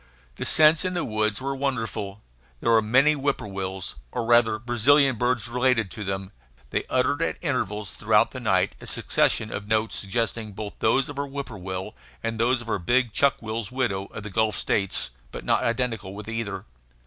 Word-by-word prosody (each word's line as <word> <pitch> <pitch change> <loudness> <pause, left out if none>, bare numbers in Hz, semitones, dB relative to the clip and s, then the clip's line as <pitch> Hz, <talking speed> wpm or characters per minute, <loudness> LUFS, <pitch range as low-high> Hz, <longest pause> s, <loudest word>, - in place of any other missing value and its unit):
The - - -2
scents 155 +2 +6
in 185 -1 -2
the 175 - -1
woods 110 -2 0
were 135 +1 -2
wonderful. 110 -7 -3 0.4
There 115 - +1
were 115 -1 +6
many 130 +8 +4
whippoorwills, 100 -10 -3 0.2
or 120 - -2
rather 120 -2 +4
Brazilian 125 +4 +4
birds 120 -1 0
related 125 -3 +1
to 105 - -6
them; 95 0 -4 0.4
they - - -1
uttered 130 +4 +1
at 165 - 0
intervals 105 - -2
through - - +4
the - - -6
night - - +2
a - - -9
succession 110 -1 +1
of 100 0 -5
notes 110 0 +1
suggesting 110 +1 -2
both 105 +1 -6
those 135 +1 +3
of 145 -2 -6
our 140 - -2
whippoorwill 95 -10 -5 0.3
and 115 -1 -2
those 120 +1 +2
of - - -15
our 100 - 0
big 120 +5 +1
chuck 140 -1 +3
will's 110 -1 -4
widow 120 -7 -1
of 105 - -8
the 105 - -7
Gulf 110 +1 +1
States, 100 -9 0 0.2
but - - -7
not - - +3
identical 115 -5 -1
with 105 +1 -8
either. 110 -4 -4
115 Hz, 185 wpm, -25 LUFS, 105-130 Hz, 0.4 s, scents